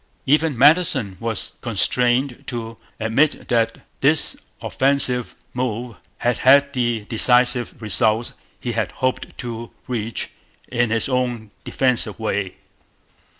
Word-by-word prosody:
Even 150 -1 +2
Madison 140 - +4
was 115 -3 -4
constrained 120 +3 +1
to 115 -1 -5 0.2
admit 115 +8 +1
that 115 -2 0 0.2
this - - +2 0.2
offensive 130 -3 +1 0.2
move 120 -1 -3 0.2
had 120 -1 0
had 140 +2 +5
the 120 -4 -1
defensive 125 +1 +2
results 110 +1 +1 0.3
he 120 - -3
had 115 -1 -2
hoped 130 -1 -3
to 115 -1 -6 0.2
reach 115 -3 -3 0.4
in 120 -1 +1
his 115 0 0
own 125 -5 -2
'defensive' 125 -4 +1
way. 100 -4 -2
120 Hz, 110 wpm, -21 LUFS, 115-130 Hz, 0.4 s, had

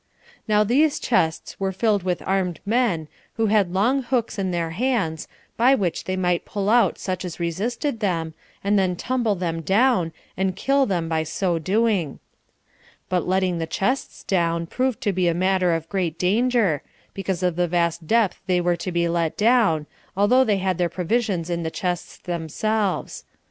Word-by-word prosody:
Now 210 -1 +4
these 280 +8 +3
chests 165 -9 0
were 195 -1 0
filled 205 +1 +1
with 180 -1 -2
armed 185 -4 0
men, 205 -8 +1 0.3
who 225 - +1
had 200 -5 +3
long 235 +9 +2
hooks 240 -4 -1
in 190 -1 0
their 170 -2 -2
hands, 195 -6 -1 0.3
by 255 +4 +5
which 185 -8 -2
they 185 - -2
might 180 -2 +1
pull 200 0 -2
out 235 -6 +4
such 185 -1 -3
as 180 -2 -6
resisted 220 - -2
them, 165 -6 -1 0.3
and 200 +1 +3
then 185 -2 +1
tumble 235 +1 0
them 170 -2 -3
down, 195 - +2 0.2
and 190 0 -1
kill 275 0 +2
them 175 -5 -1
by 160 -1 0
so 165 +2 -1
doing; 195 -3 0 0.9
but 180 0 +2
the - - -5
letting 185 -2 +1
the 165 - -2
chests 255 +11 -2
down 170 -3 0
proved 255 +7 -1
to 205 - 0
be 185 -1 +1
a 170 - +2
matter 185 0 +2
of 165 -1 -2
great 175 -4 -2
danger, 210 - +2 0.3
because 190 -2 -3
of 180 -2 +1
the 175 0 +1
vast 170 -1 0
depth 225 -3 +2
they 180 -1 +2
were 175 0 +1
to 185 - -4
be 170 0 +1
let 170 -2 -1
down, 210 -9 +3 0.3
although 245 +6 +5
they 210 -5 +1
had 185 -2 -1
their 175 -1 +2
provisions 185 -2 -1
in 170 -1 -2
the 160 - -2
chests 180 0 -3
themselves. 185 +4 -2
185 Hz, 180 wpm, -23 LUFS, 170-220 Hz, 0.9 s, by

